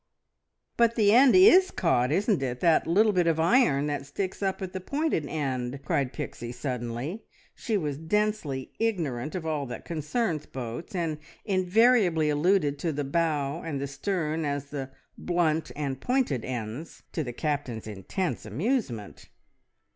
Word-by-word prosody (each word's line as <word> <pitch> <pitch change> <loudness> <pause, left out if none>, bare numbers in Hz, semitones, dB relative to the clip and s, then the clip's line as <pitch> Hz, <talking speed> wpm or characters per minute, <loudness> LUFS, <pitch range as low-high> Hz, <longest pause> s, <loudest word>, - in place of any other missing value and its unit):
"But 235 -1 +4
the 210 -3 +4
end 255 +2 +7
is 370 0 +7
caught, 125 -7 +1
isn't 200 - +2
it? 125 -2 -2
That 165 -2 +3
little 210 +6 +4
bit 180 -2 +2
of 165 -1 +2
iron 165 - +4
that 145 -2 -3
sticks 190 +6 -4
up 195 -1 -1
at 190 -1 -5
the 185 - -3
pointed 280 - -1
end!" 135 -3 -3
cried 135 -3 0
Pixie 120 -6 -6
suddenly. 125 - -4 0.3
She 220 -3 -1
was 150 -6 -3
densely 160 -6 -1
ignorant 160 - -1
of 175 -3 -4
all 150 -3 -2
that 120 - -7
concerns 160 - -2
boats, 125 - -6
and 165 -4 -1 0.3
invariably 185 -4 +3
alluded 150 -2 +2
to 165 - -1
the 145 0 -2
bow 150 0 0
and 150 -4 -4
the 140 - -2
stern 155 +2 -2
as 145 -1 -3
the 135 -2 -4 0.3
"blunt" 165 -3 0
and 140 -3 -3
"pointed" 245 - 0
ends, 125 +5 -6
to 160 - -2
the 120 - -5
Captain's 140 -5 -3
intense 110 - -3
amusement. 125 - -3
155 Hz, 155 wpm, -27 LUFS, 135-190 Hz, 0.3 s, end